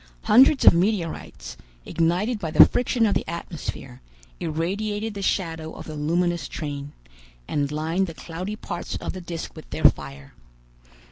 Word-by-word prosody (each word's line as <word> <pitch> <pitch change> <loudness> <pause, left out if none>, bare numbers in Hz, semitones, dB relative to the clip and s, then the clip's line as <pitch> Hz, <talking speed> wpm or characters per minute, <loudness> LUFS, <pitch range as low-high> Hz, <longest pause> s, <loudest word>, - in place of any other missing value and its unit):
Hundreds 265 +5 +6
of - - +10
meteorites, 175 -1 -2 0.3
ignited 180 +8 0
by 165 - -3
the - - +9
friction 245 -1 +1
of 205 - +2
the - - 0
atmosphere, 155 -6 -6 0.4
irradiated 205 +7 -2
the 200 - -6
shadow 165 -5 -2
of - - -9
the 155 - -7
luminous 170 +1 0
train, 145 -1 -5 0.6
and 145 -1 -1
lined 165 +5 0
the 165 - -8
cloudy 180 +7 -6
parts 175 -5 -5
of - - -4
the 185 - -7
disc 170 -1 -6
with 155 - -12
their - - -5
fire. 70 -1 +2
170 Hz, 150 wpm, -24 LUFS, 155-200 Hz, 0.6 s, of